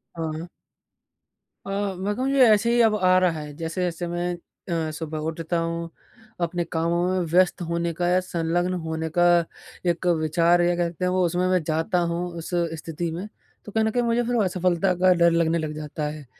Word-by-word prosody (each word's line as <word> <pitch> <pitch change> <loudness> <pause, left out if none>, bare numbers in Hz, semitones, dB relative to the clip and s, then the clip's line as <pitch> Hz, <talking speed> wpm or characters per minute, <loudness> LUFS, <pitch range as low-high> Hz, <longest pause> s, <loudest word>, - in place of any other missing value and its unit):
हाँ। 160 +1 -4 1.2
अ, - - -7 0.3
मैं 200 +3 -1
कहूँ 260 +2 -1
ये 275 -2 +5
ऐसे 235 +3 +2
ही 240 - +4
अब 220 -2 +4
आ 185 -2 +4
रहा 170 -4 +1
है। 150 -1 -8
जैसे-जैसे 175 +1 -3
मैं 175 +1 -2 0.4
अ, 160 -2 -1
सुबह 155 0 -5
उठता 165 +1 -3
हूँ, 165 0 -3 0.5
अपने 170 0 0
कामों 170 +2 +1
में 185 0 0
व्यस्त 185 +1 +3
होने 170 0 -1
का 175 +2 -1
या 180 +1 +4
संलग्न 175 0 -1
होने 160 0 -3
का 175 - +5 0.7
एक 175 +2 -4
विचार 170 +3 +3
या 175 0 +2
कह 175 -1 +1
सकते 175 +2 -4
हैं - - +2
वो 185 0 +2
उसमें 180 +2 0
मैं 185 -1 +2
जाता 160 +3 0
हूँ 170 +1 -2 0.2
उस 165 - -6 0.3
स्थिति 165 +1 -4
में। 180 +6 -5 0.4
तो 210 - -9
कहीं 220 +1 +1
न - - +2
कहीं 245 +1 +1
मुझे 235 +1 +1
फिर 245 +1 -1
असफलता 180 0 +1
का 185 +1 +4
डर 170 0 +6
लगने 165 0 +2
लग 155 -1 -3
जाता 150 0 -5
है 150 -2 -8
175 Hz, 200 wpm, -24 LUFS, 165-185 Hz, 1.2 s, डर